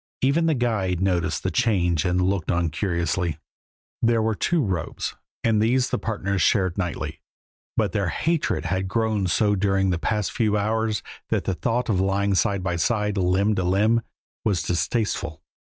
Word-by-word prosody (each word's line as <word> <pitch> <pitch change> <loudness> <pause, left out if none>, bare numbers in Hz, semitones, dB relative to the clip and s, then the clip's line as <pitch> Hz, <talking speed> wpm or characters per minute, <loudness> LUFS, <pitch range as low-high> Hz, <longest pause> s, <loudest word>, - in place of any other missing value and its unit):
Even 155 +5 +3
the 160 - +3
guide 105 -8 0
noticed 90 -3 0
the - - 0
change 90 -8 +1
and 90 0 +1
looked 95 -4 -1
on 85 -2 +1
curiously. 85 -2 -1 0.6
There 115 -1 +3
were 110 0 +1
two 165 - +1
robes 90 -4 -3 0.3
and 110 -2 +3
these 125 +3 +2
the - - 0
partners 100 -3 -2
shared 95 -5 +2
nightly, 90 -4 -3 0.6
but - - +2
their - - 0
hatred 165 - 0
had 95 +3 -1
grown 110 -1 0
so 105 +4 +2
during 95 -1 +1
the 85 - -1
past 105 +2 -1
few 105 -2 +1
hours 110 -1 0 0.3
that - - +1
the 95 - -1
thought 115 +8 -1
of 100 -6 +1
lying 100 +1 +1
side 95 0 +1
by 90 -2 -1
side, 105 +3 0
limb 95 +2 +2
to 95 - 0
limb, 105 +6 +3 0.4
was 95 -7 +1
distasteful. 90 - -1
100 Hz, 170 wpm, -24 LUFS, 90-110 Hz, 0.6 s, Even